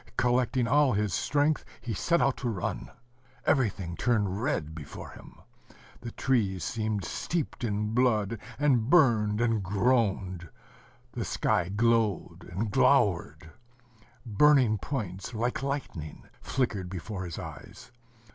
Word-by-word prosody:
Collecting 125 0 +2
all 145 0 +4
his 105 -3 0
strength, 145 - +1 0.2
he 120 - -4
set 170 - +1
out 135 - +2
to 125 - -2
run. 95 -6 -3 0.6
Everything 100 - +1
turned 105 -2 0
red 100 - -1
before 75 -3 -9
him. - - -14 0.6
The 120 - -7
trees 100 -9 0
seemed 110 -4 -2
steeped 165 - -3
in 105 -1 -1
blood, 115 -3 +1 0.2
and 130 -5 +2
burned 115 -10 +4
and 115 -3 +1
groaned. 100 -4 0 0.6
The - - -4
sky 85 - 0
glowed 110 -3 0
and 100 +4 -2
glowered.... 80 -2 +2 0.7
Burning 120 -1 +4
points, 100 -4 -5
like 120 +4 -1
lightning, 135 - -5 0.2
flickered 105 -8 -2
before 95 +1 -5
his 85 -3 -6
eyes. - - -10
110 Hz, 120 wpm, -28 LUFS, 95-125 Hz, 0.7 s, all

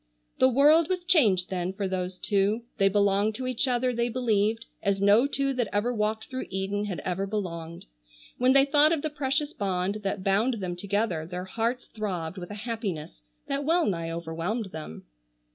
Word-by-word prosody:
The 260 - +6
world 300 +5 +5
was 365 -1 -1
changed 220 - +3
then 180 0 -2
for 195 0 -2
those 185 -1 -3
two. 205 +4 +1 0.2
They 195 0 +5
belonged 200 +1 +2
to 255 - -4
each 255 +1 -1
other 250 0 +1
they 235 0 0
believed, 225 -2 +1 0.2
as 200 -1 +1
no 205 +6 +5
two 275 0 -1
that 245 -3 0
ever 215 +4 0
walked 220 0 -1
through 260 0 -5
Eden 195 +2 -2
had 190 -4 -4
ever 190 +2 -2
belonged. 170 -5 -5 0.5
When 255 +1 +4
they 275 0 +6
thought 295 +2 +4
of 310 - -2
the 310 - -2
precious 290 +1 -1
bond 195 0 -1
that 195 -1 -3
bound 210 +6 +2
them 185 -5 -4
together 195 -3 -1
their 180 +1 -5
hearts 230 +6 -2
throbbed 185 -5 -4
with 175 - -8
a 205 - -6
happiness 195 - -4 0.2
that 275 +1 -2
well 330 +3 +2
nigh 165 -4 -1
overwhelmed 170 +6 -3
them. 155 - -8
210 Hz, 185 wpm, -27 LUFS, 185-255 Hz, 0.5 s, The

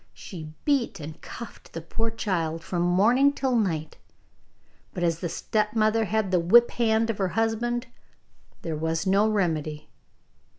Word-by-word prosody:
She 160 -5 -9
beat 280 - +1
and 155 +1 -8
cuffed 235 - -10
the - - -4
poor 225 +7 -2
child 170 -7 -2
from 175 -2 -2
morning 220 +11 +4
till 265 -3 0
night, 165 -9 -1 1.0
but 175 - -2
as 165 -1 +1
the 175 - -3
stepmother 215 +3 +1
had 215 -2 0
the 180 - +3
whip 235 +8 +5
hand 225 -1 +2
of 210 - -8
her 190 - +2
husband 235 +2 0 0.8
there 165 -2 -3
was 160 +3 -1
no 200 +3 +3
remedy. 155 -7 -1
200 Hz, 145 wpm, -26 LUFS, 165-225 Hz, 1.0 s, whip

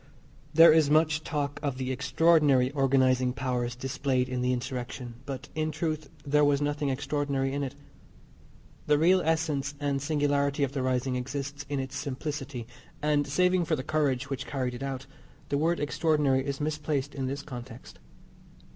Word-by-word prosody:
There 165 +1 +8
is 155 -3 +4
much 155 0 +3
talk 145 -2 -2
of 140 -4 -2
the 130 0 -2
extraordinary 140 0 +3
organising 130 -2 +2
powers 125 -2 -2
displayed 130 0 -1
in 125 -1 -2
the 125 0 +1
insurrection, 125 -1 -4
but 135 0 -5
in 155 0 -1
truth 155 -1 -3 0.2
there 150 +1 +3
was 145 -1 +3
nothing 145 0 -1
extraordinary 135 0 -1
in 140 - -1
it. 135 -2 -4 1.1
The 150 - +4
real 180 +4 +4
essence 155 -4 0
and 140 -1 -1
singularity 145 -1 +1
of 135 - 0
the 140 -1 -2
rising 130 0 0
exists 140 +3 -5
in 140 -1 -1
its 130 -1 -5
simplicity, 135 -3 -4 0.3
and, 150 -1 +1
saving 180 +5 +2
for 160 - +1
the 130 - -4
courage 145 -3 0
which 135 -2 -4
carried 130 -3 -2
it 120 - -7
out, 135 -1 -4 0.4
the 140 - +1
word 170 +3 +1
extraordinary 145 -3 +1
is 140 -1 -3
misplaced 150 -2 -2
in 135 -2 -3
this 140 +2 -4
context. 125 -3 -10
140 Hz, 165 wpm, -28 LUFS, 130-150 Hz, 1.1 s, There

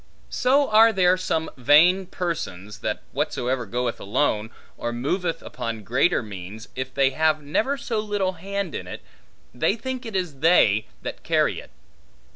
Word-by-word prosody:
So 275 +3 +3
are 225 +1 +7
there 185 -3 +4
some 160 -3 -2
vain 165 +9 +5
persons, 160 - -4
that - - -3
whatsoever 125 -1 -1
goeth 120 +2 -2
alone, 105 0 0 0.3
or 120 - -3
moveth 165 +9 -2
upon 115 -2 -5
greater 130 - +2
means, 100 +2 -9
if 130 0 -4
they 135 0 +2
have 155 +1 +1
never 225 - 0
so 230 -5 -2
little 205 -3 -1
hand 195 0 -4
in - - -5
it, - - -8 0.5
they 125 - +1
think 260 +2 -5
it 220 - -6
is 175 -7 -2
they 110 - +4 0.2
that - - -6
carry - - +1
it. - - -13
155 Hz, 155 wpm, -24 LUFS, 120-190 Hz, 0.5 s, are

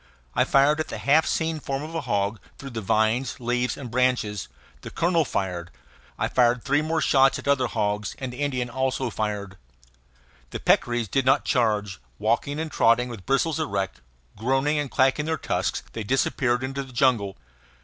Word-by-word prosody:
I - - +3
fired 140 +3 +4
at 155 - -1
the - - -5
half 155 +3 +3
seen 160 -1 -1
form 135 0 -3
of 160 +2 -7
a 165 - -2
hog, 105 -4 -1 0.2
through 140 -1 -8
the 115 -1 -4
vines, 110 +6 +1
leaves, 125 +1 -1
and 125 -4 -7
branches; 120 -5 0 0.3
the - - -7
colonel 170 -1 +1
fired; 90 -6 -3 0.5
I - - 0
fired 120 -1 +2
three 145 +2 +2
more 160 +1 -1
shots 135 -2 +4
at - - -8
other 135 -3 +3
hogs; 105 -3 -2
and 130 -2 -5
the 125 - -10
Indian 130 -4 -1
also 130 0 -1
fired. 105 -3 -3 0.9
The - - -5
peccaries 120 -2 +2
did 130 +6 0
not 135 +2 +4
charge; 105 - 0 0.2
walking 145 +1 0
and 160 -1 -3
trotting, 125 0 +3
with 110 -6 -9
bristles 155 +4 +1
erect, 95 - -2 0.3
groaning 135 +7 +1
and 145 -2 -2
clacking 135 +3 +2
their 160 0 0
tusks, - - -2
they 110 - -4
disappeared 125 +1 +1
into 135 +1 -3
the 135 -2 -10
jungle. 115 -6 +2
125 Hz, 180 wpm, -25 LUFS, 110-140 Hz, 0.9 s, fired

